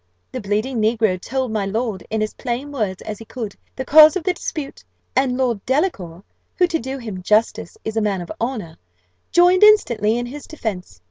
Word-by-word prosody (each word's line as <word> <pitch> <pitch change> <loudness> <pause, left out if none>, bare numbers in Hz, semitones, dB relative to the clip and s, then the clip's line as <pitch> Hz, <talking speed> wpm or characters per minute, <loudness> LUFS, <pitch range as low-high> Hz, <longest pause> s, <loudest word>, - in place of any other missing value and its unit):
The - - -5
bleeding 215 +4 -1
negro 215 -4 +1
told 260 +1 -2
my 215 -2 -1
lord, 215 -2 -2
in 220 -1 0
as 215 - -4
plain 255 +3 -4
words 210 -9 -3
as 215 -2 -6
he 225 - -10
could, 220 -4 -6 0.2
the 260 - -4
cause 310 +4 +8
of 370 - -2
the 370 - +1
dispute; 305 -5 -6 0.3
and 260 -1 +2
Lord 240 -6 0
Delacour, 200 - -1 0.3
who, 360 - +4
to 340 -2 -1
do 265 +3 -5
him 215 -7 -7
justice, 215 - +1
is 220 - -3
a 225 - +1
man 200 -3 0
of 175 - -8
honour, 225 -10 -4 0.5
joined 355 +1 +5
instantly 240 - +5
in 240 - -2
his 280 +4 -9
defence. 195 - -6
235 Hz, 195 wpm, -20 LUFS, 210-275 Hz, 0.5 s, cause